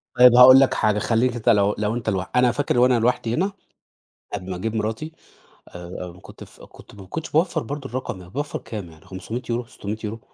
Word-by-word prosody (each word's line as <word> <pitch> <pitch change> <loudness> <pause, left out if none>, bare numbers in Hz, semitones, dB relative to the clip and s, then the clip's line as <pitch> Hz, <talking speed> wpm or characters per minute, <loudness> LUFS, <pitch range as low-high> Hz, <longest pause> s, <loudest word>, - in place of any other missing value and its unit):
طيب 125 -1 +7
هاقول 130 +2 +9
لك 135 - +3
حاجة، 105 -1 +1
خلّيك 120 +3 +1
أنت، 120 - 0
لو 105 0 +3
لو 105 +2 -1
أنت 115 -2 -3
لوحدك 95 +3 -3
أنا 125 -1 +4
فاكر 130 -1 0
وأنا 125 -1 +4
لوحدي 115 0 0
هنا، 190 +9 0 0.8
قبل 95 -2 -5
ما 95 - -3
أجيب 110 +5 -4
مراتي، 110 +9 -3 0.6
آآ، - - -20
آآ 90 0 -8
كنت - - -13
ف - - -17
كنت - - -16
ما 100 - -12
كنتش 160 - -6
باوفّر 160 -3 +1
برضه 135 +2 -6
الرقم 125 -5 -5
ده، 90 - -13
باوفّر 145 +9 -4
كام 105 -6 -8
يعني 80 - -19
€500، 115 +5 -5
€600؟ 110 -2 -6
115 Hz, 205 wpm, -22 LUFS, 105-125 Hz, 0.8 s, هاقول